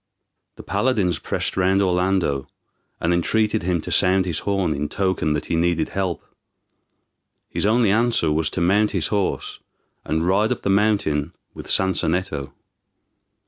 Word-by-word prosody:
The - - -11
paladins 105 -9 0
pressed - - -3
round 95 +1 +2
Orlando, 90 -7 +1 0.5
and 85 +1 +1
entreated 110 +5 +1
him 90 -2 -1
to - - -7
sound 95 0 +3
his 85 -4 -1
horn, 95 -5 0
in 75 0 -3
token 95 -5 0
that 75 - -3
he - - -2
needed 85 -1 +1
help. 95 -4 -3 1.2
His - - -1
only 110 -1 +3
answer 115 -7 +2
was 80 0 0
to 90 - -3
mount 100 +5 +3
his 80 - 0
horse, 100 -3 -2 0.4
and 80 +1 -1
ride 100 +4 +2
up - - -3
the 100 - +1
mountain 100 -8 +1 0.2
with - - -10
Sansonetto. 90 -6 0
90 Hz, 145 wpm, -22 LUFS, 80-100 Hz, 1.2 s, sound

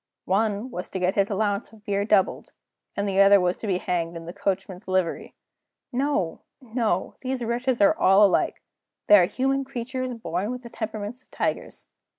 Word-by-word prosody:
One 210 +4 0
was 180 -3 -5
to 190 - -4
get 185 +1 +1
his 200 -1 +1
allowance 205 0 -1
of 220 -1 -18
beer 200 -1 0
doubled, 205 -3 +1 0.4
and 200 0 0
the 195 0 +3
other 200 0 +7
was 180 0 +1
to 220 - -6
be 190 -3 +1
hanged 170 -2 -2
in 165 - -9
his 170 - -8
coachman's 190 -1 -3
livery. 185 -3 -1 0.6
No! 255 - -1 0.2
no! 225 -7 -2
these 255 -1 -3
wretches 245 +2 0
are 200 - +5
all 195 +2 +6
alike; 195 - +1 0.4
they 205 - +8
are 180 - +5
human 270 +7 0
creatures 255 -1 -4
born 185 -2 -3
with 250 0 -5
the 235 - -10
temperaments 220 +1 -5
of - - -35
tigers. - - -3
205 Hz, 180 wpm, -25 LUFS, 190-240 Hz, 0.6 s, they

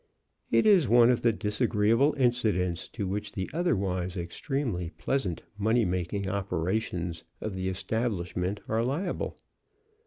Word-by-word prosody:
It - - +3
is 195 - +5
one 120 +1 +7
of 125 - +1
the 120 - +4
disagreeable 110 +5 +2
incidents 110 -9 +1
to 105 -4 -4
which 100 +2 -3
the 95 -1 -3
otherwise 95 - 0
extremely 90 - -2
pleasant 100 -12 -1 0.2
money 110 +2 +3
making 90 +2 -2
operations 90 -2 -2 0.2
of 110 - -4
the 95 0 -1
establishment 95 -1 -2
are 110 +1 +1
liable. 160 +9 -2
105 Hz, 125 wpm, -28 LUFS, 90-120 Hz, 0.2 s, one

